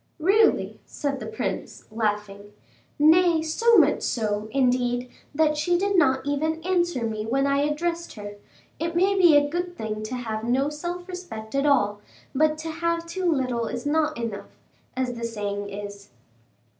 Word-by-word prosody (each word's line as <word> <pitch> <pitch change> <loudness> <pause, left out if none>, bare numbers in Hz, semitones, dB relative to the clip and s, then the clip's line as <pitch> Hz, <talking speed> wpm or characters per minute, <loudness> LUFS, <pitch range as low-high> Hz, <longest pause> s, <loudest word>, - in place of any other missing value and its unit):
"Really!" 395 +7 +2
said 280 -2 -3
the - - -6
prince, 445 - -4
laughing. 210 -2 -3 0.4
"Nay, 320 +2 +5
so 455 +9 +3
much 300 -4 +4
so, 210 -2 -1
indeed, 245 0 +1 0.2
that 305 0 +2
she 350 +4 +2
did 400 +2 0
not 265 -7 +3
even 310 +3 -1
answer 345 -7 0
me 215 -1 -3
when 265 +5 0
I 280 0 +2
addressed 335 +4 -1
her; 205 -1 -8 0.4
it 335 +1 -2
may 380 +3 +3
be 350 -6 +6
a 290 0 +3
good 350 +3 -4
thing 215 -1 -4
to 245 +4 -4
have 220 -3 -4
no 260 +4 +1
self 350 +4 -5
respect 355 -13 -8
at 275 +1 +1
all, 205 -7 +2 0.3
but 305 +2 +2
to 320 +1 -5
have 335 +1 -1
too 355 +1 -1
little 250 -5 0
is 245 +2 -5
not 310 +1 +1
enough, 230 -4 -6 0.4
as 255 -1 -1
the 235 -1 -7
saying 205 -3 -3
is." 200 0 -8
285 Hz, 165 wpm, -25 LUFS, 230-335 Hz, 0.4 s, be